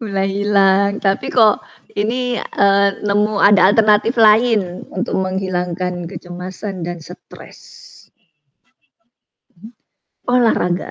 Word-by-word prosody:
Mulai 195 -3 -2
hilang, 200 0 +1
tapi 195 -1 0
kok 220 -4 +3 0.4
ini, 245 +3 -1
eee, 200 0 +1
nemu 210 +1 0
ada 200 -2 +5
alternatif 215 +2 +3
lain 215 -4 +2
untuk 190 - -3
menghilangkan 180 -2 -3
kecemasan 180 +1 -8
dan 175 -2 -7
stres. 180 +3 -14 1.9
Mhm. 205 +6 -14 0.7
Olahraga. 195 -7 0
200 Hz, 95 wpm, -17 LUFS, 185-210 Hz, 1.9 s, ada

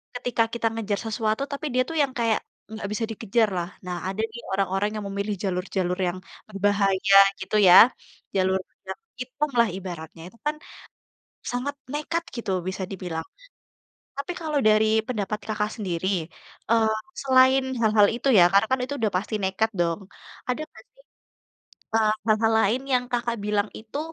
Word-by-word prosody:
ketika 245 -2 0
kita 235 -1 0
ngejar 210 -3 -2
sesuatu 220 +2 -1
tapi 280 +2 -4
dia 255 - +3
tuh - - -4
yang 275 - -1
kayak, 230 -2 +2 0.3
nggak 220 - -5
bisa 225 +2 -1
dikejar 225 0 +1
lah. 175 0 -2 0.2
Nah, 180 -1 -3
ada 200 +3 -3
nih 235 +2 -9
orang-orang 195 +1 0
yang 210 - -5
memilih 200 +1 -2
jalur-jalur 180 -1 -1
yang 175 +1 -2 0.3
berbahaya 195 -1 +3 0.2
gitu 190 +3 -3
ya, 200 +7 +10 0.5
jalur 190 0 +2 0.3
yang - - -5 0.2
hitam 270 +4 -2
lah 235 - +5
ibaratnya, 170 -3 -8
itu 230 - -21
kan 300 0 0 1.0
sangat 250 +4 -2 0.2
nekat 330 +3 -2
gitu 235 -4 -3 0.2
bisa 190 0 -3
dibilang. 175 -4 -5 0.9
Tapi 280 +6 -3
kalau 305 -3 0
dari 215 0 +5 0.2
pendapat 210 -3 -2
Kakak 210 -1 -1
sendiri, 185 -4 -2 0.6
eee, 220 -1 +3 0.3
selain 260 0 +5 0.2
hal-hal 215 -2 +5
itu 245 - -3
ya, - - +9
karena 200 +2 +5
kan 260 - +2
itu 260 - -4
sudah 215 -3 0
pasti 210 +3 -3
nekat 190 +4 +1
dong. 170 +2 0 0.5
Ada 250 +5 -1
nggak - - -16
sih, - - -24 0.9
eee, 215 -1 +4
hal-hal 220 0 +3
lain 225 +6 +2
yang 250 -1 +3
Kakak 235 -1 -1
bilang 210 0 0
itu 220 +6 -7
215 Hz, 160 wpm, -25 LUFS, 195-240 Hz, 1.0 s, ya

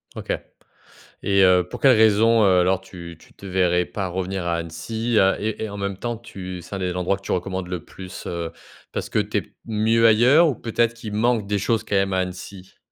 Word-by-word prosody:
OK - - -5 0.9
et 100 -1 +3
heu, 90 -1 +5
pour - - -7
quelle 130 -3 +6
raison, 110 +1 +4
heu, 95 -2 +5
alors 95 +1 +1
tu 85 -3 -10
tu - - -20
te 100 - -14
verrais 90 -2 +1
pas 95 -3 -4
revenir 95 0 -3
à 85 - +1
Annecy 110 +8 -3 0.2
et 105 - -3
et 110 - -5
et 110 - -6
en 100 - -7
même 100 -1 -3
temps 120 0 -4
tu 95 -6 -8
c'est 95 - -11
un 95 - -4
des 90 -1 -2
endroits 90 +2 0
que - - -20
tu - - -6
recommandes 95 0 -2
le 90 -2 -5
plus? 95 -1 -10
Heu, 85 -1 -4 0.4
parce - - -4
que - - +1
tu - - -1
es - - +1
p - - -26
mieux 115 +1 +3
ailleurs 125 +10 +6
ou 135 - -2
peut-être 115 0 0
qu'il 110 -3 -8
manque 110 0 +1
des 100 0 -1
choses 115 +2 0
quand 105 - -2
même 95 0 +1
à 95 - +1
Annecy? 95 +1 -6
100 Hz, 230 wpm, -22 LUFS, 90-110 Hz, 0.9 s, quelle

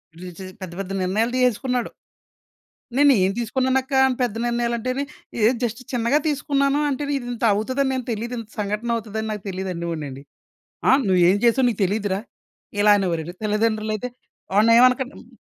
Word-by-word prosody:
ఈడు 180 +1 -9
చే 190 - -7 0.2
పెద్ద 175 -2 -7
పెద్ద 195 0 -5
నిర్ణయాలు 220 +6 0
తీసేసుకున్నాడు." 250 0 +1 1.1
"నేనేం 245 -10 +5
తీసుకున్నానక్కా 260 +3 +1
అని 255 - -1
పెద్ద 230 -3 -1
నిర్ణయాలు" 235 0 0
అంటేని. 255 +4 -2 0.4
"ఎహ్, 250 - +2
జస్ట్ 235 +2 -2
చిన్నగా 245 +5 +2
తీసుకున్నాను, 280 0 +1
అంటేను 285 +1 -2
ఇదింతవుతదని 245 +2 0
నేను 255 -2 -3
తెలీదు 235 +3 -3
ఇంత 220 -1 -9
సంఘటనవుతదని 220 +1 -2
నాకు 210 -2 -5
తెలీదు" 190 0 -4
అనే 170 0 -4
వాడినండి. 140 -4 -6 0.7
"ఆ! - - +7 0.2
నువ్వేం 185 +1 +4
చేసావో 250 +2 +4
నీకు 215 - -6
తెలీదు‌రా?" 200 0 -1 0.6
ఇలా 210 0 +6
అనేవారండి. 175 -2 -2
తల్లిదండ్రులయితే 215 +2 0 0.4
"వాడినేమనకండి." 250 +5 +5
మ్ - - -21
230 Hz, 140 wpm, -22 LUFS, 200-255 Hz, 1.1 s, ఆ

